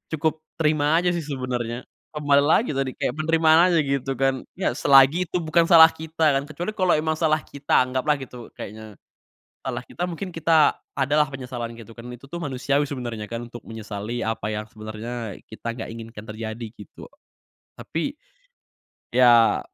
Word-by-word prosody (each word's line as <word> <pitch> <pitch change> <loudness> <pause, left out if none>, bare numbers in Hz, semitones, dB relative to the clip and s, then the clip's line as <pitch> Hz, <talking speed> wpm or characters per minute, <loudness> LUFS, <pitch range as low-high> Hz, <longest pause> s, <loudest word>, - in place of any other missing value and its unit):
cukup 160 +1 +1 0.2
terima 150 -1 +2
aja 175 +1 +2
sih 170 -1 -2
sebenernya, 125 -4 -4 0.3
kembali 145 -1 +3
lagi 160 +9 +3
tadi 135 -2 -2
kayak - - -1
penerimaan 160 +2 +5
aja 170 - +3
gitu 135 -1 -1
kan. 135 0 0
Ya 185 -8 0
selagi 140 +6 +5
itu - - -1
bukan 165 +1 +3
salah 160 -2 +9
kita 160 0 -2
kan, - - -5
kecuali 170 +7 -4
kalo 185 -4 +1
emang 155 0 -1
salah 155 -2 +2
kita 140 -2 +1
anggaplah 130 +4 0
gitu, 125 -4 -9
kayaknya, 110 0 -9 0.7
salah - - -3
kita 175 - -5
mungkin 180 +2 -4
kita 160 -2 +4 0.2
adalah 145 +2 +2
penyesalan 125 -3 -5
gitu 115 0 -13
kan, 115 - -10
itu 125 +3 -12
tuh 170 - -6
manusiawi 140 +1 0
sebenernya 120 -6 -5
kan 115 +2 -6
untuk 120 -1 -11
menyesali 110 +1 -6
apa 110 -2 -2
yang 105 +1 -4
sebenernya 110 0 -6
kita 115 +1 -5
gak 115 -1 -7
inginkan 115 -1 -9
terjadi, 110 +1 -6
gitu. 105 - -12 0.7
Tapi 275 - -4 1.0
ya 120 -2 +5
135 Hz, 160 wpm, -24 LUFS, 115-155 Hz, 1.0 s, salah